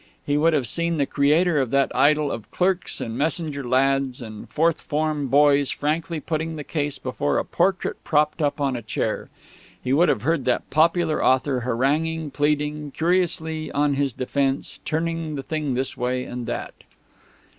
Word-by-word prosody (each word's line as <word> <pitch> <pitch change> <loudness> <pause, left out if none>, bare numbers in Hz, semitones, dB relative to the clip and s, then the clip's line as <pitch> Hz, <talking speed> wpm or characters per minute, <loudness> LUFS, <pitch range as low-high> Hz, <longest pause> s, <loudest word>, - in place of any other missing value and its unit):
He 145 - +1
would 160 +3 +3
have 140 -5 +1
seen 170 +5 0
the 140 - +2
creator 150 +4 +2
of 130 - -1
that 140 +1 +1
idol 150 -1 +3
of 115 -2 -6
clerks 185 0 0
and 115 - -4
messenger 150 0 -1
lads 135 +1 +1
and 110 -4 -9
fourth 165 +1 +1
form 150 -1 -1
boys 140 +1 +4
frankly 160 +2 -1
putting 160 +1 -3
the 150 - -5
case 145 -1 -2
before 130 +3 -1
a - - 0
portrait 185 +2 0
propped 150 +2 +1
up 145 +1 0
on 135 -2 0
a 120 - -4
chair. 110 - -3 0.5
He 130 - 0
would 170 +5 +4
have 105 - 0
heard 160 -2 +1
that 125 - 0
popular 165 0 +2
author 130 0 +2
haranguing, 145 +6 0
pleading, 150 0 0
curiously 160 -1 0
on 145 0 +2
his 140 0 0
defence, 135 +2 -2
turning 165 -1 -2
the 135 - -4
thing 150 -3 -2
this 130 +1 -1
way 125 0 -1
and 125 -1 -6
that. - - -4
145 Hz, 170 wpm, -23 LUFS, 135-160 Hz, 0.5 s, boys